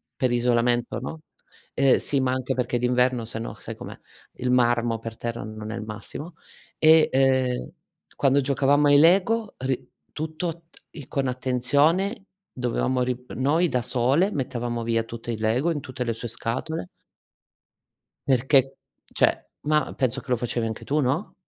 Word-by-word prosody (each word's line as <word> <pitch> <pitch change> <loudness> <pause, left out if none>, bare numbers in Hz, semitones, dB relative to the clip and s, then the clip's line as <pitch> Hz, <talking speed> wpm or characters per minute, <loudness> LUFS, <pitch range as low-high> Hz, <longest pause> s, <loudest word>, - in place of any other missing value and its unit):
per 130 -2 0
isolamento, 120 -1 +1
no 155 +5 -7 0.5
e 135 -1 +4
sì, 140 - +1
ma 130 -1 +1
anche 130 -1 -1
perché 125 -1 -1
d'inverno 125 0 +1
sennò, 115 0 -5
sai - - -8
com'è, - - -9 0.4
Il 125 0 -2
marmo 120 -2 +2
per 115 0 -8
terra 115 -2 -4
non 110 0 -7
è - - -4
il 115 - -5
massimo. 135 - -7 0.4
E, 160 0 +6
ehm, 130 -1 +2 0.5
quando 140 0 +3
giocavamo 140 +1 +3
ai 145 - +6
LEGO, 200 +6 +3
ri 130 0 -3 0.2
tutto 160 +2 -3 0.2
t - - -20
il 145 -5 -10
con 135 -2 -1
attenzione 145 - +1 0.3
dovevamo 125 +1 -1
ri 125 0 -2
noi, 155 +7 +2
da 125 -6 0
sole, 130 - +2
mettevamo 120 -3 -3
via 115 0 0
tutto 115 +1 -7
il 110 - -4
LEGO, 125 +10 +1
in 150 - -2
tutte 125 -1 -5
le 115 - -1
sue 120 +2 -6
scatole 115 - -3 1.4
perché, 135 +1 +3 0.4
cioè - - +1 0.2
mah, 150 0 +2
penso 130 -4 0
che 130 - -9
lo - - +4
facevi 120 -1 -2
anche 110 -1 -5
tu, 150 +2 0
no? 145 +9 -1
130 Hz, 160 wpm, -24 LUFS, 120-145 Hz, 1.4 s, E